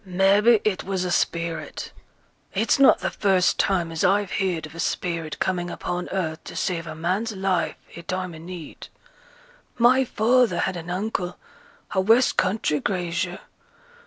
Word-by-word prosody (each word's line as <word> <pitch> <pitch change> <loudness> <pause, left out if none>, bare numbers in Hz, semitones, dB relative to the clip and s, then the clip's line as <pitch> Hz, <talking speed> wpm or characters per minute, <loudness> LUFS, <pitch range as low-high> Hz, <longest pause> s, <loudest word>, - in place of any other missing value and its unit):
'Maybe 200 +4 +4
it 205 -3 0
was 190 -1 -2
a 180 - -2
spirit. 170 -1 -2 0.6
It's 220 +7 +2
not 275 - +6
th' - - -2
first 190 -3 +2
time 175 -4 +1
as 165 - -2
I've 200 +1 +2
heared 180 -5 -1
of 155 - -12
a 165 - -10
spirit 165 -2 -2
coming 175 -2 -1
upon 175 +1 -4
earth 160 -5 -3
to - - -9
save 170 -3 -2
a 155 - -6
man's 185 +8 -1
life 190 -2 0 0.2
i' 170 - -8
time 185 0 -4
o' 160 - -10
need. 170 -1 -9 0.9
My 250 +3 +5
father 245 +1 +2
had 190 - -1
an 170 0 -7
uncle, 180 -1 -2 0.5
a 190 - +2
west 225 +6 +4
country 185 -5 +1
grazier. 180 +1 -2
185 Hz, 160 wpm, -24 LUFS, 170-205 Hz, 0.9 s, not